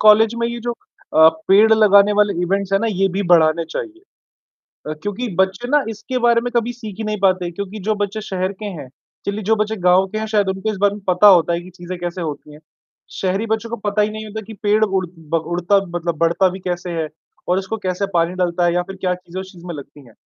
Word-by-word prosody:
College 215 +1 +6
में 235 - +2
ये 235 0 -5
जो 240 +1 -3 0.4
अ, 160 0 +9 0.2
पेड़ 210 +3 +6
लगाने 205 -1 +5
वाले 210 -1 +3
इवेंट्स 195 +2 -1
हैं 195 - +4
ना, 230 - 0
ये 195 -3 +1
भी 195 +2 -1
बढ़ाने 165 -1 +4
चाहिए। 325 - -6 0.9
अ, - - -2
क्योंकि 205 +4 -3
बच्चे 190 +5 +1
ना 295 0 +3
इसके 225 +4 -4
बारे 235 -1 +4
में 245 +1 -3
कभी 235 +1 +1
सीख 220 -4 -9
ही - - -2
नहीं 210 -1 -2
पाते 185 -2 +2
क्योंकि 200 +4 -6
जो 215 - +2
बच्चे 205 +2 -2
शहर 190 -2 -2
के - - -4
हैं, 170 -10 -6 0.4
चलिए 205 +2 -3
जो 225 - +5
बच्चे 215 +1 -1
गाँव 185 +2 +5
के - - -1
हैं 220 - -3
शायद 210 -3 +1
उनको 190 +3 -2
इस 210 - -6
बारे 200 0 +4
में 210 - -10
पता 180 +3 +5
होता 175 -3 +6
है 170 - -1
कि 180 - -12
चीजें 180 0 -7
कैसे 175 +1 -4
होती 150 -2 -6
हैं, 150 - -13 0.6
शहरी 195 +3 0
बच्चों 220 +1 -2
को 235 - -3
पता 210 +1 +1
ही 210 - 0
नहीं 215 0 -6
होता 215 +1 -6
कि 220 - -9
पेड़ 210 +1 +3
उड़ 190 -2 -1
ब 160 0 -2
उड़ता 180 +3 +2 0.2
मतलब 170 -1 -2
बढ़ता 170 +4 +3
भी 185 +2 -7
कैसे 180 -1 -4
है 155 - -2 0.4
और 180 +1 +3
इसको 195 +3 -4
कैसे 185 +2 0
पानी 170 0 +2
डलता 175 0 0
है 170 - +2
या 175 - +1
फिर 195 +2 -9
क्या 180 -1 +1
चीजें 180 0 -9
उस 190 0 -11
चीज 175 -2 -14
में 175 -2 -5
लगती 140 -1 -12
हैं। 115 - -18
195 Hz, 250 wpm, -19 LUFS, 175-215 Hz, 0.9 s, अ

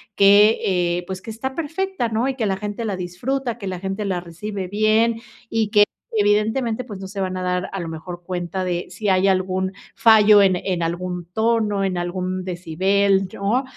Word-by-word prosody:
que, 205 +2 +6
eh, 175 -1 0
pues 185 0 -6
que 225 - -10
está 260 +5 -4
perfecta, 330 -3 -2
¿no? 225 +4 0
Y 270 - 0
que 225 -5 -1
la 190 -1 0
gente 210 +2 -4
la 200 -3 -2
disfruta, 235 +8 -3
que 195 - -6
la 185 -1 -4
gente 195 +2 -3
la 185 -3 -1
recibe 185 +3 -6
bien 215 +3 +2 0.3
y 220 -2 0
que 205 0 +6 0.3
evidentemente, 220 +3 +1
pues 205 -6 -9
no 190 - -7
se 195 0 -5
van 185 0 -2
a 185 - -3
dar 180 0 -1
a 195 - -4
lo 170 - -4
mejor 175 +2 -7
cuenta 180 +1 -3
de 175 -1 -2
si 210 -2 -3
hay 190 +1 +3
algún 190 0 0 0.2
fallo 215 -2 +7
en 190 -2 +4
en 180 -2 -2
algún 175 +1 -3
tono, 220 -2 +1
en 185 -2 -1
algún 185 +1 -3
decibel 190 +3 +1
yo, 205 +8 -1
195 Hz, 195 wpm, -21 LUFS, 185-220 Hz, 0.3 s, fallo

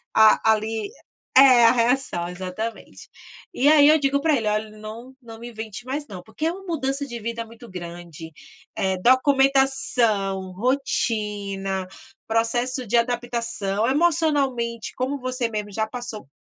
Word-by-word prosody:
a 220 0 +6
ali, 220 - -3 0.5
é, 255 -3 +8
a 230 - +7
reação 240 -7 0
exatamente. 185 +5 -7 0.4
E 275 - +1
aí 295 -2 +7
eu 310 0 +5
digo 280 0 +1
para 315 -3 +3
ele: 220 -2 -2
"Olha 215 +1 -1
não 225 +5 -9
não 225 -1 -11
me 240 +1 -8
invente 220 +1 -8
mais 290 +2 -3
não" 185 -3 -8
porque 310 - -5
é 330 - +2
uma 385 +1 -10
mudança 275 -2 -2
de 240 -2 -6
vida 230 +1 -4
muito 230 +1 -14
grande, 170 -2 -9 0.4
é 190 -1 0
documentação, 255 -7 +2
rotina, 205 -5 -2 0.4
processo 240 +3 0
de 240 - 0
adaptação, 235 -3 -1
emocionalmente, 275 -7 0
como 265 +3 -2
você 255 -2 -2
mesmo 210 -2 -4
já 220 +1 -1
passou 230 - -7
235 Hz, 145 wpm, -23 LUFS, 210-265 Hz, 0.5 s, é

